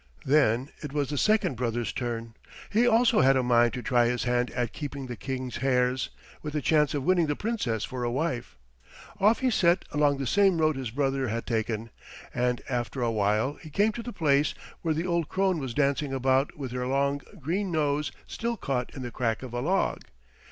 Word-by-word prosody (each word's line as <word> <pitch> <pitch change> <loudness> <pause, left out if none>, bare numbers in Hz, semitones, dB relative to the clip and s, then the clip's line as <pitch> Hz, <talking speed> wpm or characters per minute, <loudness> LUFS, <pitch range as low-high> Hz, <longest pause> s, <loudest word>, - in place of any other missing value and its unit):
Then 135 -2 +3
it 145 -2 -6
was 145 -2 -1
the 145 - -2
second 215 -10 +2
brother's 120 -2 -2
turn. 115 -2 -4 0.4
He 230 +4 +4
also 235 - +4
had 135 +1 +5
a 130 - +2
mind 120 -1 +4
to 125 - -5
try 120 -3 +3
his 125 0 -1
hand 125 0 +1
at 120 -2 -2
keeping 140 -2 -5
the 125 -1 -5
King's 130 -1 -4
hares, 125 -1 +1 0.3
with 150 -1 -5
the 150 - 0
chance 150 -2 +3
of 140 - -1
winning 175 -1 +3
the 145 - 0
Princess 200 - -2
for 125 -1 -5
a 120 - 0
wife. 125 - -2 0.6
Off 215 +5 +4
he 260 -1 +2
set 175 -4 +3
along 145 -1 +2
the 135 - -3
same 195 +4 +3
road 155 -1 +3
his 130 -3 -4
brother 135 +1 0
had 115 +1 -3
taken, 110 -1 -2 0.4
and 125 0 0
after 125 0 -2
a 115 - +1
while 105 +6 +1
he 160 - -10
came 205 +8 +2
to 235 - -6
the 240 - -6
place 145 -6 +2 0.3
where 160 -2 0
the 165 +3 -1
old 170 -3 0
crone 190 -3 +1
was 130 -4 -5
dancing 140 0 +1
about 135 +2 +1
with 135 -4 -5
her 125 0 -2
long, 140 +1 +1 0.2
green 180 +7 -1
nose 150 -2 0
still 235 0 -3
caught 130 -8 -2
in 130 - -6
the 120 - -5
crack 115 -1 -1
of 125 -2 -8
a 120 - -1
log. 185 +8 0
135 Hz, 210 wpm, -27 LUFS, 125-155 Hz, 0.6 s, had